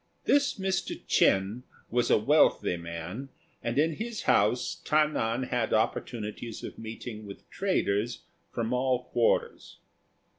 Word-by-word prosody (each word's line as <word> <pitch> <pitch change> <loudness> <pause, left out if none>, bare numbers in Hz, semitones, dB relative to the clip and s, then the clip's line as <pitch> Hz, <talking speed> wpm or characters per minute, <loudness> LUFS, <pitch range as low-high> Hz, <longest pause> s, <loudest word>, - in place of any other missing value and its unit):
This 285 0 +3
Mr. 190 -1 -2
Ch'ên 100 +5 +2 0.3
was 120 0 +1
a - - +6
wealthy 125 - +3
man, 85 +9 -6 0.3
and 120 +2 -2
in 155 +1 +2
his 230 0 -4
house 110 +5 +2
Ta 155 0 +4
nan 120 -4 -1
had 120 -3 +1
opportunities 110 0 -2
of - - -7
meeting 110 -1 -7
with 100 - -11
traders 120 - 0 0.3
from 115 0 -2
all 125 0 +1
quarters. 120 -2 0
120 Hz, 125 wpm, -29 LUFS, 105-145 Hz, 0.3 s, a